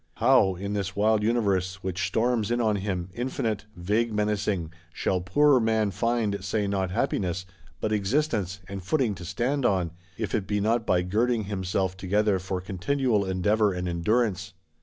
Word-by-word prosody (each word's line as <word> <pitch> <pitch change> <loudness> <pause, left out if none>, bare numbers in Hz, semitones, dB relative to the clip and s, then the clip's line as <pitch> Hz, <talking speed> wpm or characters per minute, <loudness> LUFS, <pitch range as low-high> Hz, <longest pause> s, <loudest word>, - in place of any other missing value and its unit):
How, 115 -5 +4
in 100 +3 -4
this 100 -2 -2
wild 105 +1 +3
Universe, 100 -5 0
which 95 0 -1
storms 115 -2 +1
in 120 0 +1
on 110 -3 +2
him, 95 -3 -3
infinite, 115 -3 -2
vague 105 +6 0
menacing, 105 -5 -1 0.2
shall 90 +1 -1
poor 135 +10 +4
man 110 -2 +1
find, 110 -1 0
say 100 +1 0
not 95 -2 -1
happiness, 90 0 -1 0.3
but 110 - -1
existence, 105 - 0
and 100 0 -6
footing 125 - +1
to 90 -2 -9
stand 130 - -1
on, 90 -7 +1 0.3
if 110 -3 -3
it 105 -4 -1
be 105 -1 0
not 115 +2 +1
by 90 -1 +3
girding 110 +5 +1
himself 95 -2 -1
together 100 +1 +1
for 95 +1 -3
continual 105 +4 0
endeavour 100 +3 +2
and 90 0 -3
endurance? 95 +2 0
100 Hz, 160 wpm, -26 LUFS, 95-110 Hz, 0.3 s, How